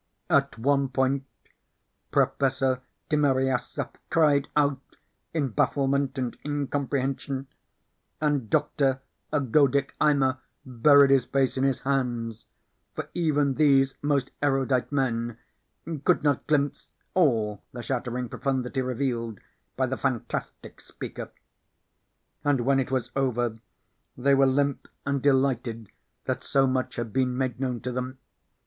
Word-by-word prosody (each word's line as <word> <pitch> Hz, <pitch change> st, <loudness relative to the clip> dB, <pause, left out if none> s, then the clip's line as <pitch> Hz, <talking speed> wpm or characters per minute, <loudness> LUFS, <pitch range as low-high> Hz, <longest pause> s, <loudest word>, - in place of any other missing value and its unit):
At -, -, +2 dB
one 140 Hz, +3 st, +2 dB
point 135 Hz, +1 st, 0 dB, 0.8 s
Professor 135 Hz, -2 st, +1 dB, 0.3 s
Timiryaseff 135 Hz, -4 st, +1 dB, 0.2 s
cried 150 Hz, -3 st, +3 dB
out 140 Hz, -2 st, +2 dB, 0.5 s
in 150 Hz, -5 st, 0 dB
bafflement 140 Hz, +4 st, +1 dB
and 125 Hz, -2 st, -2 dB
incomprehension, 140 Hz, -1 st, -2 dB, 0.7 s
and 145 Hz, -7 st, 0 dB
Doctor 140 Hz, -2 st, +1 dB, 0.3 s
Ergodic 140 Hz, 0 st, +2 dB
Eimer 140 Hz, -3 st, +3 dB, 0.3 s
buried 140 Hz, +2 st, +5 dB
his 135 Hz, -3 st, +4 dB
face 135 Hz, -1 st, +1 dB
in 130 Hz, -, 0 dB
his 135 Hz, -2 st, +1 dB
hands, 120 Hz, -5 st, -2 dB, 0.5 s
for -, -, -5 dB
even 150 Hz, -5 st, +1 dB
these 135 Hz, -2 st, +4 dB
most 140 Hz, -3 st, 0 dB
erudite 135 Hz, -2 st, +1 dB
men 120 Hz, -4 st, -1 dB, 0.7 s
could -, -, +3 dB
not 145 Hz, -3 st, +1 dB
glimpse 145 Hz, -2 st, 0 dB, 0.2 s
all 110 Hz, -, +2 dB
the 120 Hz, -1 st, -7 dB
shattering 125 Hz, 0 st, -2 dB
profundity 130 Hz, +1 st, -2 dB
revealed 120 Hz, -4 st, -2 dB, 0.4 s
by 130 Hz, -, +2 dB
the 130 Hz, +1 st, -3 dB
fantastic 130 Hz, -5 st, -4 dB
speaker. -, -, -8 dB, 1.1 s
And 145 Hz, -3 st, +2 dB
when 135 Hz, +2 st, +3 dB
it 130 Hz, -, -1 dB
was 130 Hz, -3 st, -1 dB
over 120 Hz, -4 st, 0 dB, 0.6 s
they 140 Hz, +3 st, +3 dB
were 135 Hz, 0 st, +5 dB
limp 140 Hz, +1 st, 0 dB, 0.2 s
and 140 Hz, -1 st, 0 dB
delighted 130 Hz, -5 st, +1 dB, 0.3 s
that -, -, -2 dB
so 135 Hz, -1 st, +3 dB
much 130 Hz, -1 st, -1 dB
had 115 Hz, -3 st, -4 dB
been 125 Hz, -1 st, +1 dB
made 130 Hz, -2 st, -1 dB
known 125 Hz, -3 st, -2 dB
to 125 Hz, -, -3 dB
them. 125 Hz, +1 st, -4 dB
135 Hz, 120 wpm, -26 LUFS, 125-140 Hz, 1.1 s, buried